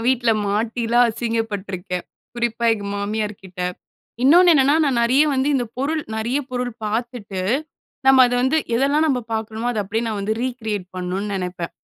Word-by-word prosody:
வீட்ல 245 -2 +3 0.2
மாட்டிலாம் 230 +3 +2
அசிங்கப்பட்டுருக்கேன். 205 -6 -3 0.3
குறிப்பா 235 0 -1
எங்க 205 -2 -7
மாமியார்க்கிட்ட. 200 -3 -4 0.6
இன்னொன்னு 345 +6 +7
என்னன்னா, 280 +1 +4
நான் 265 -5 +1
நெறைய 260 +6 +4
வந்து 265 +2 +1
இந்த 255 -3 +1
பொருள் 305 +4 -1
நெறைய 235 +5 0
பொருள் 245 -1 -2
பார்த்துட்டு, 215 -3 -3 0.7
நம்ம 265 -1 +8
அத 245 - -1
வந்து 260 +5 +2 0.2
எதெல்லாம் 280 +5 +2
நம்ப 265 -5 +1
பார்க்கிறமோ 220 +1 -3
அத 235 - -3
அப்படியே 220 +4 -2
நான் 220 -2 -2
வந்து 205 +2 -1
ரீகிரியேட் 220 -6 -3
பண்ணுன்னு 185 +3 -3
நெனைப்பேன். 180 -2 -4
230 Hz, 145 wpm, -21 LUFS, 205-255 Hz, 0.7 s, நம்ம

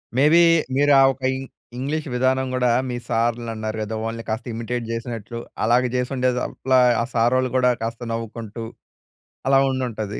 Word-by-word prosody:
May 135 - +3
be 170 - +7 0.3
మీరు 145 +1 +3
ఆ - - +7
ఒక 130 - -22 0.2
ఇం - - -6 0.4
ఇంగ్లీష్ 150 +4 -2
విధానం 130 +1 +1
గూడా, 125 -1 +2 0.2
మీ 120 - -3
సారులన్నారు 115 -2 -1
గదా, 110 +1 -3
వాళ్ళని 115 +1 -4
కాస్త 110 +1 -3
ఇమిటేట్ 115 +1 -4
జేసినట్లు 115 0 -5 0.2
అలాగ 120 +3 +4
జేసిండే 125 0 0 0.2
అట్లా, 130 -1 0 0.2
ఆ - - +1
సారోళ్ళు 125 +2 +2
గూడా 125 -1 +4
కాస్త 115 +1 -4
నవ్వుకుంటూ, 115 0 -5 0.8
అలా 135 0 +5
ఉండుంటది. 115 -5 -3
120 Hz, 155 wpm, -22 LUFS, 115-130 Hz, 0.8 s, be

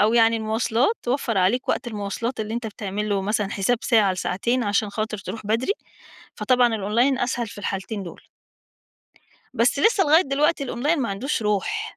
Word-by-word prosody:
أو 215 +3 +3
يعني 230 -1 +5
المواصلات، 225 - 0
وفََّر 240 -5 0
عليك 230 +8 +1
وقت - - 0
المواصلات 220 +2 -3
اللي 215 +1 -4
أنت 235 -1 -3
بتعمل 210 0 -4
له 200 -1 0
مثلًا 205 0 -1
حساب 215 +5 0
ساعة 215 -5 +3
لساعتين 235 +7 -1
عشان 205 0 0
خاطر 215 0 -3
تروح 215 +1 -7
بدري، 230 - +1 0.6
فطبعًا 245 -3 +2
الأونلاين 235 +6 +1
أسهل 245 -2 -1
في 205 - -11
الحالتين 200 +1 -4
دول. 175 - -11 1.3
بس - - +2
لسّه 440 -4 +4
لغاية 315 +4 +5
دلوقتي 285 +1 +1
الأونلاين 285 +5 0
ما 235 - -1
عندهوش 225 +5 -2
روح. 410 - -1
225 Hz, 165 wpm, -23 LUFS, 205-255 Hz, 1.3 s, يعني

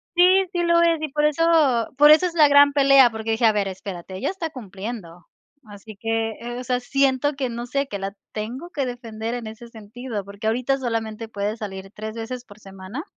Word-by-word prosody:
Sí, 370 +2 +5
sí 350 -2 -1
lo 340 0 +4
es, 335 -2 +2
y 310 - -1
por 295 +2 -1
eso 300 -6 +3
por 295 +1 +8
eso 310 +4 +6
es 355 - -2
la 305 -3 +5
gran 285 0 +6
pelea, 275 -3 +6
porque 220 0 -4
dije: 225 +1 +1
“A 220 - +5
ver, 205 -2 0
espérate, 190 -1 -8
ella 190 - -2
está 360 -4 -4
cumpliendo”. 200 - -8 0.4
Así 205 +1 -12
que, 225 +2 -1
eh, 240 +1 -6
o - - -6
sea, 250 -1 0
siento 275 +2 +1
que 270 -2 -2
no 235 +1 -5
sé, 275 +2 -2
que 200 - -5
la 195 +1 -4 0.2
tengo 245 +11 -6
que 280 -5 -2
defender 230 -2 -5
en 235 -3 -6
ese 225 +2 -10
sentido, 220 -1 -7
porque 200 +2 -6
ahorita 250 +4 +1
solamente 225 -2 -3
puede 205 0 -3
salir 195 -3 -7
3 215 +1 -7
veces 240 +2 -6
por 205 -2 -16
semana 195 +7 -8
235 Hz, 215 wpm, -23 LUFS, 215-280 Hz, 0.4 s, por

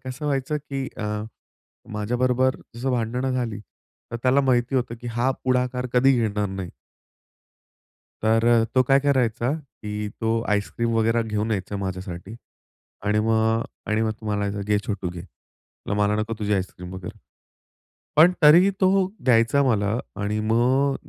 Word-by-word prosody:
कसं 130 +4 -6
व्हायचं 140 +1 0
की 135 -1 -3
अ, - - -5 0.9
माझ्याबरोबर 125 +4 +1 0.2
जसं 130 +3 -2
भांडणं 125 +2 -1
झाली 115 -5 -2 0.5
तर - - -1
त्याला 130 +2 +4
माहिती 130 0 +1
होतं 120 -2 -1
की 120 - -8
हा 125 +3 +2
पुढाकार 125 0 0
कधी 135 +2 +5
घेणार 105 -2 0
नाही. 95 -2 -5 1.5
तर 115 +1 +3
अ, 120 -1 +5
तो 130 - +5
काय 135 +2 +4
करायचा 130 -3 +1 0.3
की 105 0 -3
तो 115 0 +1
आईस्क्रीम 105 +3 0
वगैरे 115 +1 +2
घेऊन 110 0 -2
यायचा 100 0 -2
माझ्यासाठी 95 +1 -5 0.7
आणि 105 +1 +2
मग 110 +1 +2 0.2
आणि 110 +1 +1
मग 110 -1 +1
तो 110 +1 -12
म्हणायचा, 105 -1 -1
"घे 105 +1 +1
छोटू 95 -4 -3
घे." 90 -1 -7 0.7
म्ह 100 - 0
"मला 105 0 +2
नको 110 +1 -2
तुझी 105 0 0
आईस्क्रीम 90 -1 -4
वगैरे." 95 -2 -8 1.0
पण 170 +4 +8
तरीही 170 +6 +8
तो 190 0 +4 0.2
द्यायचा 115 +3 +4
मला 110 -4 +1 0.2
आणि 105 +1 -1
मग 130 +4 +3
115 Hz, 150 wpm, -24 LUFS, 105-130 Hz, 1.5 s, पण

